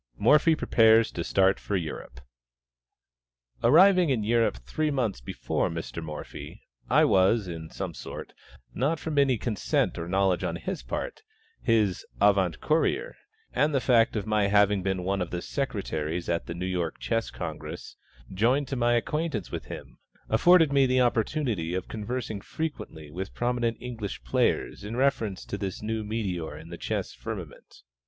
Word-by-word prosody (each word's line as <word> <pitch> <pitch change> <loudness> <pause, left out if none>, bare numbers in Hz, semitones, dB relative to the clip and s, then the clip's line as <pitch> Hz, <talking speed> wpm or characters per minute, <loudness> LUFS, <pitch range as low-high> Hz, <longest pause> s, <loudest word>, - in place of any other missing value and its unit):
MORPHY 150 +2 +5
PREPARES 115 -5 +4
TO 85 - -3
START 95 +2 +3
FOR 105 - -3
EUROPE. 75 -7 -6 1.4
Arriving 185 -3 +6
in 120 -6 +1
Europe 115 - +2
three 150 - -2
months 120 - -1
before - - -2
Mr. 80 0 -5
Morphy, 75 -1 -8 0.3
I - - +5
was 95 +2 +3
in 80 -2 -6
some - - -5
sort, - - -8 0.4
not 145 +7 0
from 150 -1 -1
any 135 -3 +3
consent 110 -5 -1
or 85 - -4
knowledge 95 0 +1
on - - -1
his - - -4
part, - - -5 0.4
his 110 -6 +2 0.2
avant 95 -5 +3
courier; 165 - +1 0.4
and 150 -1 +2
the - - +4
fact 115 -3 +3
of 105 -3 -2
my 105 -2 +2
having 100 -1 +4
been 95 -1 -1
one 95 +1 -1
of 90 - -2
the 90 - -3
Secretaries 85 - -3
at 85 -1 -1
the 85 - -5
New 90 +1 -4
York 90 -3 -2
Chess 115 -1 -1
Congress, - - -7 0.4
joined 125 +8 +2
to 135 - -2
my 120 -1 +2
acquaintance 145 - -2
with - - -5
him, - - -9 0.3
afforded 160 +6 +5
me 135 -1 +5
the 130 0 +2
opportunity 115 - 0
of 95 - -3
conversing 110 -1 -4
frequently 85 - -6
with 95 +4 -6
prominent 120 -1 0
English 115 - -6
players 60 +9 0
in 105 +3 -5
reference 120 -7 0
to 100 - -5
this 100 +1 -4
new 110 0 -2
meteor 95 -8 -3
in 80 +2 -11
the 85 - -7
chess - - -3
firmament. - - -8
105 Hz, 160 wpm, -27 LUFS, 90-125 Hz, 1.4 s, Arriving